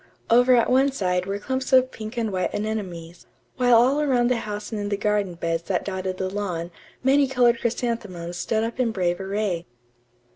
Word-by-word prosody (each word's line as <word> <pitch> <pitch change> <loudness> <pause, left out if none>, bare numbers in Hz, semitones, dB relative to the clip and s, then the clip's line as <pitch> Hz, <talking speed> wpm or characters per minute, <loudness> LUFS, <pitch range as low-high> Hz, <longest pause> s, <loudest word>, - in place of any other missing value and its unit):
Over 245 +2 +6
at 235 - +3
one 270 +2 +3
side 180 -7 -1
were 200 +1 -2
clumps 260 +5 -3
of 260 0 +5
pink 220 +2 -8
and 225 -3 -1
white 185 -1 -1
anemones; 185 -6 -5 0.3
while 245 -1 +4
all 260 +6 +4
around 250 -4 +2
the 250 - +2
house 210 -1 -5
and 215 -2 -3
in 205 - -3
the 200 - -1
garden 205 -3 0
beds 165 -1 -2
that 185 -2 -1
dotted 190 -1 -3
the 190 - -2
lawn 185 -4 -4 0.3
many 275 +1 +4
colored 245 -3 +3
chrysanthemums 210 -8 -3
stood 220 +5 -1
up 230 +2 -4
in 250 -2 +2
brave 180 -4 -1
array. 195 -3 -2
210 Hz, 190 wpm, -24 LUFS, 185-245 Hz, 0.3 s, Over